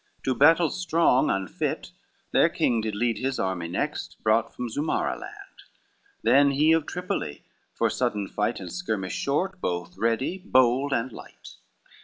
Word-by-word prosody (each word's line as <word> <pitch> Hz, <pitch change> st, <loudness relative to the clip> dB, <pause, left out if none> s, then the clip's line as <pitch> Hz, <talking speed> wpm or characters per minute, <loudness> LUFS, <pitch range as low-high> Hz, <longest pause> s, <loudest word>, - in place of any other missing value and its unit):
To 130 Hz, -, +1 dB
battle 160 Hz, +4 st, +5 dB
strong 165 Hz, -7 st, +2 dB
unfit, 95 Hz, -3 st, -2 dB, 0.4 s
their -, -, +4 dB
king 115 Hz, -2 st, +1 dB
did 110 Hz, -1 st, -3 dB
lead 115 Hz, 0 st, 0 dB
His 130 Hz, 0 st, -1 dB
army 95 Hz, -3 st, -2 dB
next 85 Hz, -, -3 dB
brought 110 Hz, +1 st, +2 dB
from 125 Hz, -, -5 dB
Zumara 145 Hz, +7 st, -1 dB
land. -, -, -11 dB, 0.6 s
Then 140 Hz, +5 st, +5 dB
he 150 Hz, +3 st, +3 dB
of 160 Hz, -2 st, +2 dB
Tripoli, 175 Hz, -, -4 dB, 0.3 s
for -, -, +2 dB
sudden 100 Hz, -2 st, -1 dB
fight 105 Hz, +4 st, -1 dB
And -, -, -7 dB
skirmish 110 Hz, -, -3 dB
short, 185 Hz, +7 st, -1 dB
both 90 Hz, 0 st, -3 dB
ready, 115 Hz, -, 0 dB
bold, 130 Hz, +2 st, +3 dB
and 125 Hz, 0 st, 0 dB
light. -, -, -12 dB
125 Hz, 150 wpm, -26 LUFS, 105-150 Hz, 0.6 s, battle